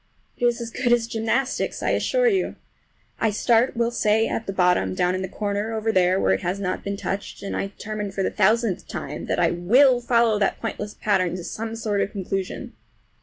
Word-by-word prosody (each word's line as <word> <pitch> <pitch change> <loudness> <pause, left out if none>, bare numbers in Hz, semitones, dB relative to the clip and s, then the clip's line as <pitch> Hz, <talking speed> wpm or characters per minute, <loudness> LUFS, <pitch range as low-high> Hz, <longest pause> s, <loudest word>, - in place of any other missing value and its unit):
It 245 - -1
is 240 0 0
as 230 -1 -5
good 245 0 0
as 240 -1 +4
gymnastics, 230 +4 -1
I - - +1
assure - - +1
you. 390 -5 +1 0.6
I 225 - +2
start, 230 +3 +2
we'll 235 0 +1
say, 220 -1 +2
at 225 - -3
the - - -1
bottom, 180 - +2
down 180 - +1
in 185 - -2
the 190 - -3
corner 205 +3 -3
over 220 0 0
there 185 -1 +3
where 95 - +3
it 95 - -1
has 180 +3 -2
not 185 -2 -2
been 200 0 -3
touched, 200 +1 -5
and 200 - -4
I - - -1
determine 210 0 -5
for 195 0 -2
the - - 0
thousandth 215 -1 +1
time - - -6
that - - 0
I - - +3
will 245 +9 +4
follow 235 -3 +3
that 195 - 0
pointless 210 -2 -5
pattern 185 -4 +1
to 180 - -6
some 225 +5 -5
sort 215 -3 -1
of - - 0
a - - -22
conclusion. 195 -1 -4
210 Hz, 220 wpm, -24 LUFS, 190-230 Hz, 0.6 s, as